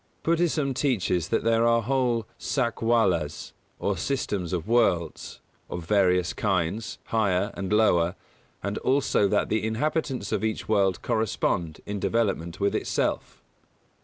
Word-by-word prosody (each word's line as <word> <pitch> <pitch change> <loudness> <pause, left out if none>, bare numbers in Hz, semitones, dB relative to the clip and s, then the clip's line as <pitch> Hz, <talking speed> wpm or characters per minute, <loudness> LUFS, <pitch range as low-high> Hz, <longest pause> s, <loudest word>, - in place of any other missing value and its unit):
Buddhism 160 -4 +1
teaches 100 - 0
that - - +1
there 115 0 +3
are 115 0 +3
whole 125 -2 +1
Sakwalas, 115 - 0 0.2
or - - -1
systems 105 -10 -2
of 90 -1 -2
worlds, 105 -8 0 0.3
of 85 -1 -5
various 90 -2 +2
kinds, 95 +2 -1
higher 100 -2 0
and 95 0 -5
lower, 95 -5 +3 0.5
and 100 +1 -2
also 130 -6 +2
that - - +1
the 110 0 0
inhabitants 130 0 -1
of - - -1
each 110 0 -2
world 100 -4 +1
correspond 85 -7 -1
in 105 0 -4
development 95 -6 -1
with 100 0 +1
itself. - - -2
105 Hz, 130 wpm, -26 LUFS, 90-115 Hz, 0.5 s, there